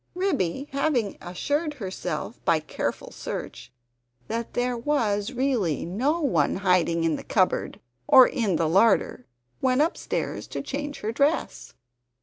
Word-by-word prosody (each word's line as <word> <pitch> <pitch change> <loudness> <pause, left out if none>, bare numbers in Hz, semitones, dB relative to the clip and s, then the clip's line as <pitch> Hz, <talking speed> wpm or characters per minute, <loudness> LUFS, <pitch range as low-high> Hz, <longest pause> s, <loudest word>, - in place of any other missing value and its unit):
Ribby 285 - -1
having 270 -7 0
assured 290 - -2
herself 190 - -5
by 165 - +3
careful 155 - -4
search - - -7 0.6
that 230 0 -4
there 245 0 0
was 230 -5 0
really 245 - 0
no 265 - 0
one 170 - +2
hiding 180 -3 +2
in 160 -2 +1
the - - -8
cupboard 185 -4 0 0.3
or 260 -1 +9
in 210 -7 0
the 160 0 +1
larder 190 - +3 0.3
went 260 +1 +3
upstairs 330 - -3
to - - -5
change 290 +1 -5
her 215 - -2
dress. 285 +7 -1
230 Hz, 130 wpm, -25 LUFS, 180-280 Hz, 0.6 s, or